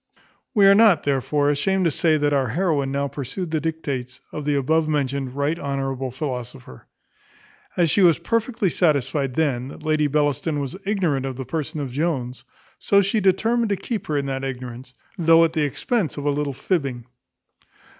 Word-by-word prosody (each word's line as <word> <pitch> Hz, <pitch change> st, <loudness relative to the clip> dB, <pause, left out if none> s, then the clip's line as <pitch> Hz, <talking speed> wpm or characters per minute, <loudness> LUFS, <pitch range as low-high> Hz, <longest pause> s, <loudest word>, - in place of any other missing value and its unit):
We 205 Hz, -2 st, +6 dB
are 195 Hz, -, +8 dB
not, 200 Hz, -6 st, +5 dB
therefore, 145 Hz, +1 st, +1 dB
ashamed 185 Hz, +6 st, +1 dB
to 165 Hz, -, +3 dB
say, 155 Hz, +2 st, +2 dB
that 145 Hz, 0 st, +1 dB
our 135 Hz, -2 st, +2 dB
heroine 145 Hz, -, 0 dB
now 140 Hz, +1 st, -1 dB
pursued 145 Hz, +6 st, -5 dB
the 155 Hz, -2 st, 0 dB
dictates 140 Hz, -6 st, -4 dB
of 150 Hz, -, -6 dB
the 145 Hz, -1 st, +1 dB
above 155 Hz, +3 st, +1 dB
mentioned 140 Hz, -3 st, -1 dB
right 145 Hz, +4 st, -1 dB
honourable 135 Hz, -2 st, -3 dB
philosopher. 125 Hz, -, -7 dB, 0.9 s
As 170 Hz, -4 st, +3 dB
she 205 Hz, -, +3 dB
was 170 Hz, -4 st, +6 dB
perfectly 225 Hz, -4 st, -1 dB
satisfied 140 Hz, -5 st, +1 dB
then, 130 Hz, -6 st, 0 dB
that 140 Hz, -, -11 dB
Lady 155 Hz, -1 st, +2 dB
Bellaston 145 Hz, +1 st, 0 dB
was 140 Hz, +1 st, -4 dB
ignorant 165 Hz, -10 st, 0 dB
of 130 Hz, -, -5 dB
the 130 Hz, +1 st, -6 dB
person 155 Hz, +2 st, -4 dB
of 140 Hz, -3 st, -4 dB
Jones, 135 Hz, -4 st, -2 dB, 0.4 s
so 200 Hz, 0 st, +3 dB
she 200 Hz, +3 st, +1 dB
determined 220 Hz, +4 st, +2 dB
to 200 Hz, -, +1 dB
keep 220 Hz, +2 st, -5 dB
her 150 Hz, -, 0 dB
in 140 Hz, -, -1 dB
that 135 Hz, -1 st, -3 dB
ignorance, 125 Hz, -1 st, -7 dB, 0.2 s
though 165 Hz, 0 st, +6 dB
at 165 Hz, -, -2 dB
the 160 Hz, -, 0 dB
expense 175 Hz, -, -1 dB
of 145 Hz, -, -5 dB
a 145 Hz, -, +3 dB
little 145 Hz, 0 st, -1 dB
fibbing. 135 Hz, -5 st, -2 dB
145 Hz, 180 wpm, -22 LUFS, 135-165 Hz, 0.9 s, are